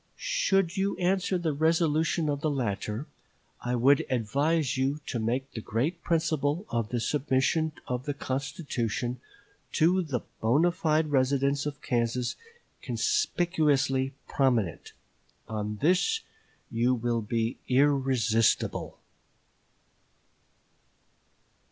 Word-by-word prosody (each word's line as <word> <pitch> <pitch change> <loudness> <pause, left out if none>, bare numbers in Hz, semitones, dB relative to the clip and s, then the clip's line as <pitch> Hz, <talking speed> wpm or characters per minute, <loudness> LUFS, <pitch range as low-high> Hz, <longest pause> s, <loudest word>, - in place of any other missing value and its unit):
Should 195 - +1
you 195 +1 0
answer 185 +1 +1
the 165 -3 -1
resolution 160 +1 +2
of 145 -1 -1
the 155 - +1
latter, 110 -2 -2 0.6
I 125 0 0
would 135 +4 +4
advise 135 +5 +1
you 135 +3 0
to 120 - -3
make 125 +5 -1
the 110 - -6
great 145 - -2
principle 160 +1 0
of 115 -2 -1
the 120 - -1
submission 150 +4 +1
of 125 +1 -3
the 145 -2 -2
constitution 130 - -3 0.5
to 180 +4 +3
the 140 -8 -2 0.2
bonâ 150 +10 +3
fide 160 -4 +1
residents 140 +1 +2
of 145 -2 -6
Kansas 120 0 0 0.5
conspicuously 145 - +1
prominent. 120 - 0 0.5
On 105 -1 -3
this 185 - +3 0.5
you 120 +2 +2
will 120 -1 -1
be 115 +1 -1
irresistible." 130 -5 +2
140 Hz, 105 wpm, -28 LUFS, 120-160 Hz, 0.6 s, would